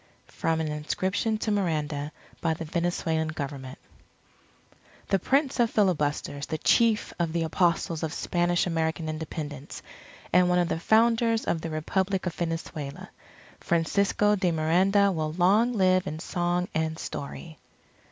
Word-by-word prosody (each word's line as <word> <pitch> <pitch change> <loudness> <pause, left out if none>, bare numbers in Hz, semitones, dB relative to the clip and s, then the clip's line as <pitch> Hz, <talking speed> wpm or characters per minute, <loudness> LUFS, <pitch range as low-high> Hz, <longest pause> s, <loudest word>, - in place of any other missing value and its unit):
_ - - -22
From 165 0 -1
an 160 - -1
inscription 190 +8 -1
to 215 0 -2
Miranda, 155 -7 -1 0.3
by 165 -1 +1
the 165 - -6
Venezuelan 165 -1 -1
Government 140 -4 -6 1.3
_The 195 - +3
Prince 275 +2 +1
of 235 -1 +4
Filibusters, 150 -8 0
the 155 - -2
Chief 225 +6 +2
of 165 -2 0
the 170 -1 0
Apostles 170 0 +1
of 160 -2 -2
Spanish 175 +1 0
American 160 -1 -1
Independence, 155 -2 -6 0.5
and 180 0 +5
one 180 - +3
of 175 -1 +2
the 165 - -1
founders 225 +3 +3
of 165 - -1
the 165 - -4
Republic 190 +5 -1
of 180 - -2
Venezuela, 165 0 -5 0.5
Francisco 200 +5 +2
de 185 -3 +1
Miranda 185 +6 +3
will 155 -3 -2
long 200 +8 +3
live 185 -3 +3
in 155 - -4
song 175 +2 -1
and 160 0 -1
story. 155 +3 -7
170 Hz, 140 wpm, -27 LUFS, 160-190 Hz, 1.3 s, and